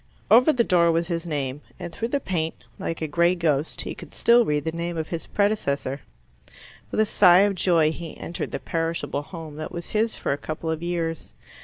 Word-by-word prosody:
Over 250 +7 +7
the 250 -5 +2
door 170 -5 +4
was 165 +1 0
his 170 0 -2
name, 140 -3 -3 0.2
and 170 - -7
through 230 - -2
the 280 +4 0
paint, 165 -9 -3 0.2
like 165 -1 -3
a - - -1
grey 170 +4 +3
ghost, 155 -3 0
he - - -4
could - - -12
still 235 +1 +5
read 150 -1 0
the 160 - -1
name 170 +1 -4
of 160 -1 -3
his 165 -2 -5
predecessor. 145 -10 0 0.9
With - - -2
a 215 - +5
sigh 185 -3 +6
of 200 0 +3
joy 170 -4 +3
he 165 0 -8
entered 170 - -5
the - - -3
perishable 165 -3 -2
home 155 -1 -9
that 155 - -5
was 170 -1 -7
his 220 +1 +1
for - - -1
a 140 - -5
couple 160 +2 -4
of 160 0 -3
years. 170 -2 -3
170 Hz, 210 wpm, -24 LUFS, 155-180 Hz, 0.9 s, Over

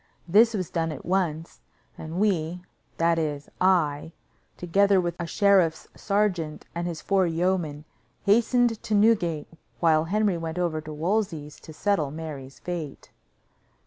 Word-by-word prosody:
This 220 +6 +5
was 185 -5 -3
done 165 -1 -1
at 145 - -8
once, 170 -3 -1 0.4
and 160 +3 -6
we, 180 -4 0 0.3
that 165 0 +2
is, 150 -2 -3
I, 160 -4 +2 0.4
together 195 +3 +3
with 175 -2 -2
a 170 - -3
sheriff's 190 -5 +2
sergeant 190 -7 -1
and 170 +1 -3
his 165 -3 -5
four 195 -2 +2
yeomen, 165 -3 -1 0.4
hastened 230 +2 +3
to 215 - -1
Newgate, 195 -8 +2 0.3
while 160 -2 +3
Henry 200 0 +1
went 165 0 -5
over 170 -3 -1
to 155 0 -9
Wolsey's 160 -2 -2
to - - -12
settle 160 -2 0
Mary's 145 -3 -8
fate. 170 -5 -6
170 Hz, 140 wpm, -26 LUFS, 155-195 Hz, 0.4 s, This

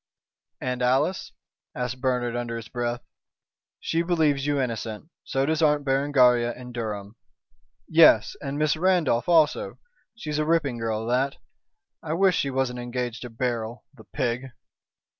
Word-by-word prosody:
"And 125 0 -3
Alice?" 135 +9 +1 0.4
asked 125 0 -4
Bernard, 125 -2 0
under 120 -1 -3
his 115 - -9
breath. 120 0 -3 0.8
"She 165 - 0
believes 155 -5 +1
you 145 -1 +1
innocent, 115 +3 -4
so 135 0 0
does 160 +2 0
Aunt 150 -2 +3
Berengaria 130 -4 +3
and 125 -1 -10
Durham. 105 -2 -5 0.7
Yes! 160 -9 +5
and 140 0 -4
Miss 155 0 +2
Randolph 170 -7 +1
also. 160 -3 +3 0.4
She's 155 -9 -4
a 155 - +1
ripping 150 -7 +1
girl 110 -1 -2
that. 130 +4 0 0.7
I 160 -2 -3
wish 185 +1 +3
she 140 - 0
wasn't 130 -2 -1
engaged 120 -1 -4
to 125 - -6
Beryl, 115 0 -3
the 115 -5 -16
pig!" 125 -1 -2
130 Hz, 140 wpm, -25 LUFS, 120-150 Hz, 0.8 s, Yes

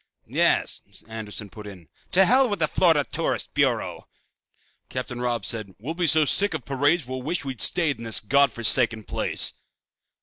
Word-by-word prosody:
"Yes," - - +1 0.3
Anderson 105 -2 -7
put 105 -1 -10
in, 90 -5 -12 0.2
"to 190 +1 +5
hell 255 +4 +3
with 205 - -2
the - - +1
Florida 160 -5 +2
Tourist - - -3
Bureau!" - - -1 0.8
Captain 125 -1 -5
Robb 120 -4 -2
said, 105 -4 -5
"We'll 135 +10 -6
be 175 0 -1
so 155 0 +4
sick 200 +4 +3
of 145 - -6
parades 145 +3 +1
we'll 130 +1 -6
wish 170 +4 -3
we'd 130 -5 -6
stayed 160 -5 +2
in - - -8
this 115 -3 +2
God 140 +4 +2
forsaken 115 -1 +3
place." - - 0
130 Hz, 170 wpm, -24 LUFS, 110-160 Hz, 0.8 s, to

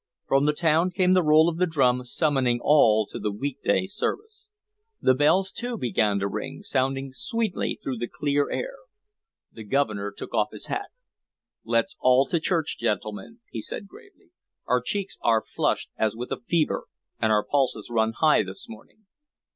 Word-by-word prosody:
From 135 +1 +2
the 150 - +3
town 165 +2 +2
came 185 0 +2
the 185 - +5
roll 155 0 +5
of 170 -1 -1
the 180 +1 +2
drum 125 -6 +2
summoning 130 -3 +1
all 110 -7 +4
to - - -8
the 105 - -2
week 135 +6 -4
day - - +2
service. 420 - -4 0.5
The 130 - +4
bells 180 +8 +3
too 245 +2 -5
began 110 - +1
to 100 0 -1
ring, 100 - -6
sounding 135 +1 -1
sweetly 230 - -1
through 130 -2 -3
the 120 - -2
clear 145 +2 0
air. - - -4 0.7
The 110 - -10
Governor 105 -4 -1
took - - -9
off 105 -2 +1
his 105 - -4
hat. 400 0 -4 0.7
"Let's 305 - 0
all 130 +1 +4
to 170 - +1
church, 160 -1 -1
gentlemen," 110 - -3
he - - -4
said 200 - -5
gravely. 395 - -18 0.3
"Our 125 0 +2
cheeks 195 - -3
are 115 -2 +2
flushed - - -1
as 110 -1 0
with 120 +2 -6
a - - -2
fever 170 -9 0 0.3
and 110 - +2
our 105 -1 +3
pulses 125 -6 0
run 110 -1 +1
high 155 +5 +4
this 195 - -6
morning. 225 -1 -14
140 Hz, 175 wpm, -25 LUFS, 115-185 Hz, 0.7 s, the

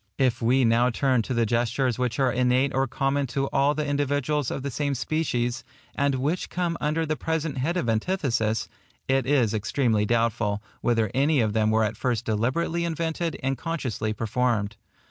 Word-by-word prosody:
If 125 -3 +1
we 125 +2 +3
now 115 +2 +4
turn 130 0 +2
to 120 - -4
the 115 -1 +2
gestures 120 +2 0
which 125 -3 -1
are 130 -2 +3
innate 125 +2 +2
or 135 +1 +1
common 135 +2 0
to 135 +3 -1
all 140 +2 +2
the 150 - -1
individuals 145 -1 0
of 135 - -4
the 140 - -3
same 140 +2 -1
species, 125 -4 -1 0.3
and 140 -1 +1
which 145 +7 -1
come 175 -2 -1
under 155 +2 0
the 155 0 -1
present 160 -3 -2
head 165 +8 0
of 175 - -1
antithesis, 115 - 0 0.4
it 135 -1 +1
is 130 -6 +3
extremely 110 0 +1
doubtful, 115 -3 +1 0.2
whether 115 -2 +1
any 140 +3 +3
of 110 -3 +1
them 110 0 +2
were 110 0 +3
at 105 0 -2
first 120 -2 -1
deliberately 130 +10 0
invented 165 0 -2
and 135 0 -1
consciously 130 - -2
performed. 115 -1 -1
130 Hz, 180 wpm, -25 LUFS, 115-145 Hz, 0.4 s, now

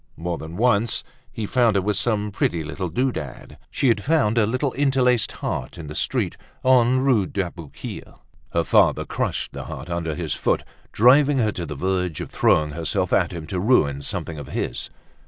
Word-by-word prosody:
More 85 +1 -3
than 80 +2 -8
once 115 -1 +2 0.3
he 110 -4 -4
found 115 -1 +2
her 100 - +3
with 105 +1 0
some 105 0 0
pretty 85 -4 0
little 85 +4 -4
doodad. 80 - -3
She 135 - 0
had 105 -3 +1
found 140 -8 +2
a 105 - +3
little 130 +4 -1
interlaced 130 -5 +2
heart - - -4
in 85 - -7
the 75 - -7
street - - -1 0.3
on 130 0 +4
Rue 125 -8 +3
d'Aboukir. 85 -6 -6 0.4
Her - - +1
father - - +3
crushed - - -2
the - - -6
heart 75 +7 -7
under 85 -2 -2
his - - -2
foot, - - 0 0.3
driving 135 +5 +5
her 110 -4 +2
to 85 -4 -5
the 75 - -5
verge 90 0 -1
of - - -6
throwing 75 -1 +3
herself 85 +4 -1
at 90 - +3
him 85 -3 -6
to 90 +2 -3
ruin 75 - +2
something 75 +2 -4
of 70 - -8
his. - - -3
100 Hz, 185 wpm, -23 LUFS, 85-125 Hz, 0.4 s, driving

